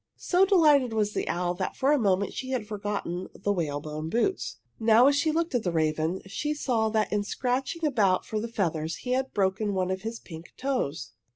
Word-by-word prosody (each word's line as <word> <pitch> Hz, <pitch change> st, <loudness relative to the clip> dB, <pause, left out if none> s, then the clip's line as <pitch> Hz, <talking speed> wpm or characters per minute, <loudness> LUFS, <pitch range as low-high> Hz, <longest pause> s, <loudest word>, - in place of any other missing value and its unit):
So 370 Hz, +1 st, +3 dB
delighted 300 Hz, -, +4 dB
was 210 Hz, -1 st, 0 dB
the -, -, -2 dB
owl 175 Hz, 0 st, 0 dB
that 185 Hz, +1 st, -3 dB
for 270 Hz, +2 st, +2 dB
a 295 Hz, -, +4 dB
moment 200 Hz, -3 st, +1 dB
she 260 Hz, -, -5 dB
had 255 Hz, -5 st, -2 dB
forgotten 205 Hz, -4 st, -4 dB
the 205 Hz, -, -1 dB
whalebone 155 Hz, -2 st, -3 dB
boots. 240 Hz, -, -1 dB, 0.2 s
Now 225 Hz, +2 st, +6 dB
as 280 Hz, +1 st, +5 dB
she 315 Hz, +2 st, +2 dB
looked 330 Hz, 0 st, -1 dB
at 245 Hz, -, +2 dB
the 180 Hz, -, -1 dB
raven 160 Hz, +2 st, 0 dB
she 295 Hz, +10 st, -3 dB
saw 235 Hz, -6 st, 0 dB
that 215 Hz, -1 st, 0 dB
in 205 Hz, -1 st, +1 dB
scratching 260 Hz, +9 st, -2 dB
about 205 Hz, -10 st, +2 dB
for 215 Hz, -, -3 dB
the 225 Hz, -, -3 dB
feathers 165 Hz, -8 st, -2 dB
he 250 Hz, -, -6 dB
had 265 Hz, +1 st, 0 dB
broken 200 Hz, +1 st, 0 dB
one 185 Hz, 0 st, 0 dB
of 190 Hz, 0 st, -3 dB
his 225 Hz, +2 st, -5 dB
pink 165 Hz, -1 st, -11 dB
toes. 160 Hz, -, -2 dB
210 Hz, 205 wpm, -27 LUFS, 185-260 Hz, 0.2 s, Now